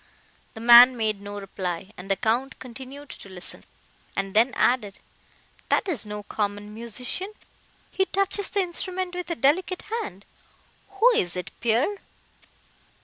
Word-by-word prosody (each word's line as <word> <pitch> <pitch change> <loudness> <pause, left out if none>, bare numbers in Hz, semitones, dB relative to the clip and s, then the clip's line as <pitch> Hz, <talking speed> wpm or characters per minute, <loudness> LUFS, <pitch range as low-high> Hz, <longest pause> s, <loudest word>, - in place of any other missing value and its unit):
The 220 - -8
man 240 +2 +9
made 215 -3 -1
no 205 0 -6
reply, 190 -1 -5
and 180 +2 -10
the 195 - +3
Count 240 +6 0
continued 265 +3 -10
to 195 - -10
listen, 185 -1 -5 0.5
and 195 0 -2
then 230 +4 +4
added, 215 -6 +1 0.7
"That - - +2
is 285 - -2
no 210 0 -5
common 205 0 -3
musician; 245 - -4 0.6
he 380 - +2
touches 395 +1 0
the 400 - +1
instrument 365 0 -3
with 360 -1 -5
a 340 - -1
delicate 345 +6 +1 0.2
hand; 190 +2 -8 0.6
who 400 +4 +3
is 175 - +1
it, 180 -1 -5
Pierre?" 240 - +1
235 Hz, 145 wpm, -25 LUFS, -, 0.7 s, man